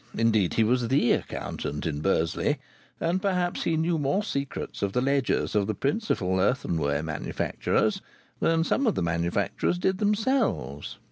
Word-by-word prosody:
Indeed, 110 -5 +2
he 115 - +4
was 120 +2 +2
the 130 0 +3
accountant 75 0 -3
in 75 -3 -2
Bursley, 80 -1 +1 0.4
and 175 +3 0
perhaps 180 -3 0
he 165 - +1
knew 165 +1 +1
more 150 +9 +1
secrets 140 -9 -4
of 100 -1 -1
the - - +2
ledgers 135 0 +1
of 105 -2 +2
the 110 - -1
principal 120 - 0
earthenware 80 - +1
manufacturers 80 -2 -1 0.4
than 165 0 +2
some 270 +9 +1
of 220 - +2
the - - 0
manufacturers 85 - 0
did 190 +1 0
themselves. 210 - 0
125 Hz, 150 wpm, -27 LUFS, -, 0.4 s, he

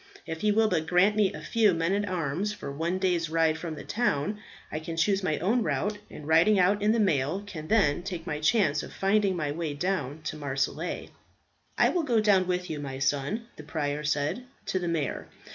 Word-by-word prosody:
If 160 -1 -5
he 210 - +3
will 220 +1 +4
but 160 -6 0
grant 180 +5 +4
me 205 -3 +3
a - - -8
few 215 -5 +3
men 165 +3 0
at 205 0 0
arms 180 +3 -1
for 140 - -7
one 165 +6 -1
day's 175 -4 0
ride 160 -1 +2
from 160 -1 -5
the - - -8
town, 210 -3 -1 0.3
I 155 - -2
can 165 +1 -6
choose 195 +4 +2
my 155 -5 0
own 220 +8 +1
route, 205 +5 -1
and 150 - -10
riding 165 +6 +5
out 200 +3 +3
in 215 +1 +3
mail 155 +3 0
can 155 -6 -7
then 175 -8 +3
take 175 -3 -5
my 150 -3 -3
chance 155 -4 +2
of - - -9
finding 195 -1 +2
my 150 -4 -1
way 155 -1 -3
down 155 -3 -2
to 155 - -4
Marseilles." 140 +3 -2 0.7
"I - - +5
will 355 - +1
go 245 -8 +2
down 200 -4 +3
with 180 0 -1
you, 155 - -4
my 135 -2 -5
son," 140 - -1
the 155 - -9
prior 150 -1 -2
said, 150 - -1 0.2
"to 185 - -1
the 175 - -3
mayor. 160 -5 -2
170 Hz, 210 wpm, -28 LUFS, 150-205 Hz, 0.7 s, riding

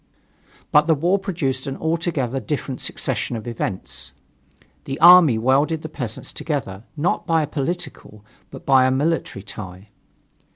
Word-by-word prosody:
But 150 +1 +5
the 160 - +4
war 175 +7 +1
produced 145 -9 -2
an 135 - -4
altogether 160 -6 -1
different 130 +2 -4
succession 120 -2 -2
of 110 - -6
events. 95 - -4 0.7
The 135 +2 -5
army 175 -8 +8
welded 140 +7 +2
the 155 - -5
peasants 120 -6 -6
together, 115 -10 -4
not 160 +5 0
by 165 -1 +3
a - - -3
political, 140 - -5 0.2
but - - -11
by 135 -2 +5
a - - +2
military 140 - -1
tie. 95 0 -9
135 Hz, 140 wpm, -22 LUFS, 115-160 Hz, 0.7 s, army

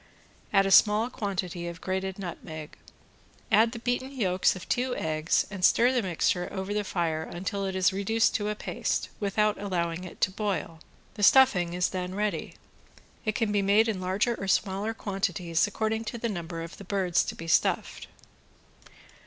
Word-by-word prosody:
Add 195 -1 +4
a 195 - 0
small 215 +4 +5
quantity 180 -5 -3
of 170 -1 -7
grated 190 +1 -3
nutmeg. 160 -5 -7 0.8
Add 220 +2 +5
the 235 - -6
beaten 245 +3 -2
yolks 190 -10 +1
of 185 - -9
two 250 0 0
eggs 155 0 0
and 190 -3 -6
stir 240 +6 +5
the 250 -2 +1
mixture 180 -1 0
over 190 +1 -4
the 210 0 0
fire 165 -5 -1
until 195 +5 -4
it 190 - -4
is 190 +1 +3
reduced 220 +4 +1
to 210 -1 -1
a 210 - -2
paste, - - -2
without 210 +1 +1
allowing 175 -3 -2
it 180 - -10
to 185 - +3
boil. 195 -5 -3 0.3
The 210 - -8
stuffing 205 -7 +5
is 180 0 +1
then 185 0 -4
ready. 210 0 -2 0.7
It 215 -1 0
can 225 -3 0
be 205 -1 +2
made 205 +3 +4
in 205 -4 -2
larger 190 +6 +1
or 195 - -5
smaller 195 +4 0
quantities 185 -5 -1
according 220 +2 -2
to 235 +2 -4
the 235 0 -2
number 170 -4 -5
of 165 - -9
the - - -10
birds 190 -3 +1
to - - -5
be 165 - -8
stuffed. - - +1
195 Hz, 180 wpm, -28 LUFS, 180-215 Hz, 0.8 s, small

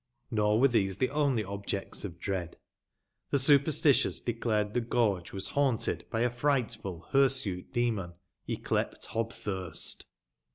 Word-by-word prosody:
Nor 105 -1 +2
were 135 - +6
those 95 -7 +1
the 130 - 0
only 140 -6 +1
objects 100 0 -3
of 85 -4 -7
dread. 90 -4 -3 0.7
The - - +2
superstitions 140 +1 +4
declared 110 -3 -1
the 120 - +1
gorge 110 -6 0
was 95 - -4
haunted 135 -5 0
by 115 - -1
a 120 - +3
frightful, 120 - -1
hirsute 130 -9 +2
demon, 115 -8 -1 0.4
yclept - - -2
Hobthnrst. 100 -6 -3
115 Hz, 125 wpm, -30 LUFS, 100-130 Hz, 0.7 s, were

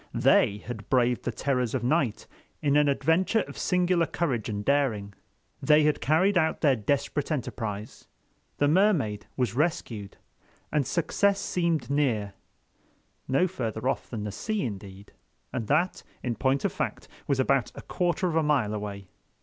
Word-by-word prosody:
They 100 - +4
had 110 -4 -7
braved 125 -1 +2
the 120 - 0
terrors 125 0 -1
of 125 - -2
night 130 -3 0 0.3
in 145 -1 +1
an 150 -1 +4
adventure 160 +10 +2
of - - -8
singular 180 -2 +1
courage 130 -11 -2
and 105 -1 -4
daring, 120 -8 +1 0.5
they 150 0 +5
had 150 0 +1
carried 180 +5 +3
out 160 -1 0
their 140 -4 +4
desperate 140 +6 -1
enterprise, 110 -7 -4 0.5
the 145 - +3
Mermaid 150 - +2
was 125 -5 0
rescued, 120 - -2 0.5
and 150 -4 +1
success 195 +4 +1
seemed 170 -6 -1
near—no 130 - -3
further 115 - -3
off - - -1
than 110 -4 -4
the 105 - -4
sea 215 - -2
indeed, 100 -3 -7 0.4
and 115 -4 -3
that, 165 +6 +1 0.2
in 125 - -1
point 135 +2 +1
of - - 0
fact, - - -3 0.2
was 140 -2 +1
about 130 -1 +2
a - - -9
quarter 180 +2 0
of 165 - -2
a 160 - +4
mile 140 -9 +1
away. 100 -2 -5
135 Hz, 155 wpm, -27 LUFS, 110-160 Hz, 0.5 s, they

